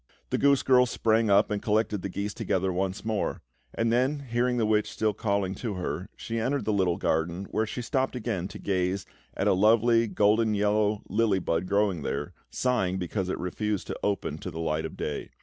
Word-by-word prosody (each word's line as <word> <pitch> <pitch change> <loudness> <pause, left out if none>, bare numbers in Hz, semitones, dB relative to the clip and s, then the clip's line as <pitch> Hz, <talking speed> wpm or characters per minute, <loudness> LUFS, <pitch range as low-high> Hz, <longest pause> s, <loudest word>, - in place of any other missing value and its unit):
The - - +1
goose 140 -1 +4
girl 125 -1 +5
sprang 115 -2 +2
up 100 +1 +4
and 105 -1 -1
collected 105 -2 +1
the 100 - -4
geese 100 +2 -3
together 95 -1 -1
once 95 +3 -2
more; 110 -2 -2 0.3
and 115 0 +1
then, 130 +4 +1
hearing 125 -1 0
the 115 - +2
witch 105 -1 +2
still 110 -1 0
calling 100 -2 -1
to 105 +1 -4
her, 90 0 -4
she 115 0 -4
entered 135 +5 -1
the 110 - +1
little 95 -4 +2
garden, 85 +4 -1
where 110 0 0
she 125 - -4
stopped 130 +1 0
again 105 -7 -2
to 100 +1 -9
gaze 95 0 -1 0.3
at - - +1
a - - +5
lovely 115 +4 +4
golden 110 +1 +2
yellow 105 0 +1
lily 105 0 +2
bud 85 -1 -1
growing 100 -3 +1
there, 70 +1 -3 0.2
sighing 95 -8 0
because 95 +1 -2
it - - -1
refused 105 +3 -2
to - - -5
open 100 -1 -1
to - - -5
the 80 - -8
light 80 -1 -1
of - - -7
day. 75 - -4
105 Hz, 200 wpm, -27 LUFS, 95-115 Hz, 0.3 s, girl